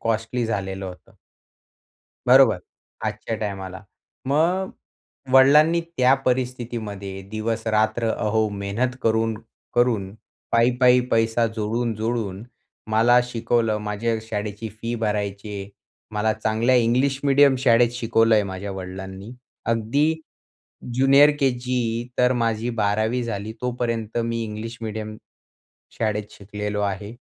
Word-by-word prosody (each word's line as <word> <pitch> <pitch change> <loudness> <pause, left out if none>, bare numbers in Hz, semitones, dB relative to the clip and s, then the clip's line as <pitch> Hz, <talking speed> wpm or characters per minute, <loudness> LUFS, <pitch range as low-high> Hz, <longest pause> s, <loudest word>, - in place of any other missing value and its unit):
Costly 115 +1 -1
झालेलं 95 -3 -3
होतं. 90 -1 -11 1.1
बरोबर. 125 -6 +6 0.5
आजच्या 115 - -3
टाईमाला. 95 -2 -5 0.4
मग 170 +7 +1 0.6
वडिलांनी 150 +5 +6 0.2
त्या 130 +1 +5
परिस्थितीमध्ये 115 -6 -3
दिवसरात्र 110 0 0
अहो 110 0 +1
मेहनत 100 +5 -2
करून 110 0 +1 0.4
करून 110 -6 +1 0.4
पै-पै 125 +2 +4
पैसा 115 +1 +2
जोडून-जोडून 110 -2 -2 0.5
मला 120 +3 +5
शिकवलं. 115 -2 0
माझ्या 105 +2 -2
शाळेची 105 0 -5
फी 115 +3 -5
भरायची 105 -2 -2
आहे. 100 0 -6 0.4
मला 105 +1 +1
चांगल्या 110 +3 +1
इंग्लिश 125 +3 +2
मीडियम 140 -1 +5
शाळेत 120 -2 +4
शिकवलंय. 115 -2 +3
माझ्या 95 +1 -5
वडिलांनी 95 +2 -7 0.3
अगदी 115 +8 +1 0.8
ज्युनियर 135 +3 +6
केजी 125 -3 -1
तर 125 0 +4
माझी 115 0 0
12वी 110 +2 0
झाली, 110 -2 -4
तोपर्यंत 120 -3 -2
मी 115 0 -2
इंग्लिश 110 +2 -6
मीडियम 110 -1 -5 0.8
शाळेत 105 -1 -2
शिकलेलो 105 +1 -5
आहे 100 +2 -3
115 Hz, 105 wpm, -23 LUFS, 105-120 Hz, 1.1 s, बरोबर